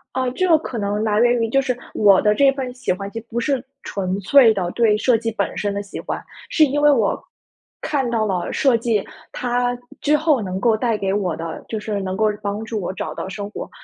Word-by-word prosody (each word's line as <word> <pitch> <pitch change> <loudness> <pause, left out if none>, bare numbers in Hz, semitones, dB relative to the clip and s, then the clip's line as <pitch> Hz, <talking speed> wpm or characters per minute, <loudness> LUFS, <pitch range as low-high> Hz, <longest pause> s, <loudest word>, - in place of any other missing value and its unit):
哦， 260 -1 0
这 370 - +1
个 325 -3 +6
可 250 -6 -6
能 205 +1 -1
来 210 -1 +1
源 240 0 +4
于 225 - 0
就 275 +3 +3
是 250 -2 -2 0.2
我 200 -3 +5
的 210 0 +3
这 275 +4 +4
份 260 -2 -4
喜 250 - -2
欢 195 +2 -3
就 225 - -5
不 235 +1 -2
是 265 0 0 0.2
纯 190 -1 -3
粹 225 +3 +6
的 185 -3 -2
对 220 -3 +3
设 235 +1 +3
计 225 0 -3
本 215 - -2
身 205 -1 -1
的 200 - -2
喜 200 - -8
欢。 - - -4 0.3
是 315 - +4
因 290 +1 -1
为 295 - +6
我， 230 -8 +1 0.6
看 270 -5 -1
到 225 -2 0
了 185 -4 -2
设 270 -5 +3
计， 225 -3 0 0.3
它 245 0 -1 0.2
之 300 +1 +3
后 305 -5 +2
能 185 -1 -3
够 225 +1 +3
带 230 -1 0
给 195 -1 -1
我 190 -5 -1
的 165 0 -6
就 220 - -3
是 210 -2 -3
能 190 0 -3
够 220 - +2 0.2
帮 205 +1 -3
助 220 -3 -3
我 180 - -3
找 - - -5
到 - - -5
生 205 +1 -6
活 - - -7
225 Hz, 255 characters per minute, -21 LUFS, 200-250 Hz, 0.6 s, 个